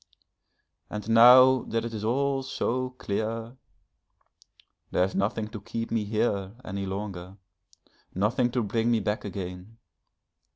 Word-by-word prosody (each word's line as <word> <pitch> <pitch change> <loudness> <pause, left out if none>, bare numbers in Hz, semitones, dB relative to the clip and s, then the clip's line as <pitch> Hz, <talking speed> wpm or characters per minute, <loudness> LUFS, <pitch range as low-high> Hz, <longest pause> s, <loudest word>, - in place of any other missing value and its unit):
And 105 -1 -6
now 125 +3 +8
that 115 0 -2
it 115 - -5
is 105 -1 -5
all 135 +4 0
so 130 -1 -2
clear, 115 0 -4 1.3
there 90 - +2
is 95 - -1
nothing 105 +2 -1
to 110 -2 -8
keep 115 +2 -5
me 110 -2 0
here 100 -2 -1
any 95 +1 -4
longer, 95 -1 -6 0.8
nothing 120 +6 +1
to 125 - +1
bring 115 +3 0
me 115 -1 +3
back 105 +1 -2
again. 95 +1 -7
110 Hz, 130 wpm, -27 LUFS, 100-120 Hz, 1.3 s, now